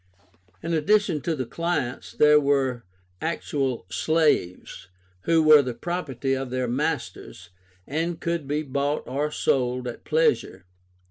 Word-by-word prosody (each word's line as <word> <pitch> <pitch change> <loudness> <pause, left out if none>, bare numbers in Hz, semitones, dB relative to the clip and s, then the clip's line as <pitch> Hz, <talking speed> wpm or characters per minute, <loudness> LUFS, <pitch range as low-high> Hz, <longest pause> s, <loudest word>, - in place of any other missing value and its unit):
In 165 +1 -2
addition 180 0 +2
to 165 +2 -1
the 130 -3 -3
clients 165 -3 -3
there 150 0 +5
were 135 -4 0 0.4
actual 140 - -2
slaves, 155 - 0 0.4
who 165 -1 +3
were 155 -1 +8
the 125 -3 -4
property 140 -7 -3
of 135 -1 -3
their 130 0 -2
masters, 125 - -4 0.3
and 165 +3 -2
could 170 -4 -2
be 150 +2 -1
bought 140 +1 -1
or 145 +4 -1
sold 125 -3 0
at 120 - -7
pleasure. 155 - 0
145 Hz, 130 wpm, -25 LUFS, 130-160 Hz, 0.4 s, were